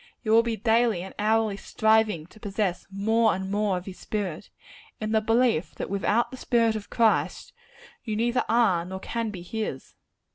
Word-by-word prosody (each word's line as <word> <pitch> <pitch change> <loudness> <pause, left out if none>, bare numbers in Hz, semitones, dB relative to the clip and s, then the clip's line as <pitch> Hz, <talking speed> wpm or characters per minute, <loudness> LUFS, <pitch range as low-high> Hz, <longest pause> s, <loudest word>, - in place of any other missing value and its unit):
You 215 - -1
will 225 +1 +7
be 230 -1 -2
daily 225 -3 +2
and 190 - -9
hourly 215 -1 +1
striving 220 -5 +2
to 215 - -18
possess 195 -3 -2
more 220 +3 +2
and 190 +1 -5
more 205 -2 +1
of 180 - -7
his 190 -2 -9
spirit; 200 -4 -4 0.5
in 215 0 -3
the 220 -1 +3
belief 225 -5 +1
that - - -5
without 205 +4 +1
the 260 - -8
spirit 230 -3 +2
of 210 -2 -6
Christ, 230 -3 +1 0.5
you 215 -3 -3
neither 240 +3 +1
are 215 -8 +3
nor 190 +2 -6
can 230 +3 -3
be 185 -4 -7
his. 195 -7 -5
215 Hz, 180 wpm, -26 LUFS, 195-225 Hz, 0.5 s, will